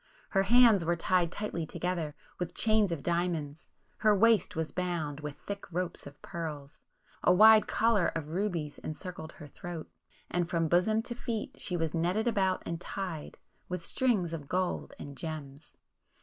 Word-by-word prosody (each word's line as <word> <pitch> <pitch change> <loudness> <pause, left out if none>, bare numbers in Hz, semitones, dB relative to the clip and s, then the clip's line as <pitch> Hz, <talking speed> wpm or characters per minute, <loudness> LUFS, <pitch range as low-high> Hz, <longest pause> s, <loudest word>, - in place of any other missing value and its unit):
Her 195 - +3
hands 225 -2 +6
were 170 +1 +1
tied 175 0 +1
tightly 205 -4 -3
together,—with 170 0 -4
chains 215 -4 +3
of 155 -5 -3
diamonds; 170 -4 -2 0.3
her 215 -1 +4
waist 225 +1 +4
was 160 -1 -2
bound,—with 155 -5 -3
thick 200 -2 -6
ropes 175 -2 -3
of 140 +1 -13
pearls;—a 150 -1 -4
wide 215 +3 +8
collar 220 -5 +3
of 155 -2 -3
rubies 170 -4 -2
encircled 160 0 -7
her 150 - -11
throat;—and 175 +2 -6
from 165 -1 +1
bosom 200 +7 +3
to 240 - -3
feet 230 -2 -4
she 180 - -1
was 165 -2 -1
netted 180 +7 +1
about 190 -5 +1
and 170 0 -4
tied,—with 180 -1 -6
strings 205 -10 +1
of 145 -4 -6
gold 185 0 -1
and 140 -1 -8
gems. 150 -3 -7
175 Hz, 145 wpm, -31 LUFS, 160-200 Hz, 0.3 s, wide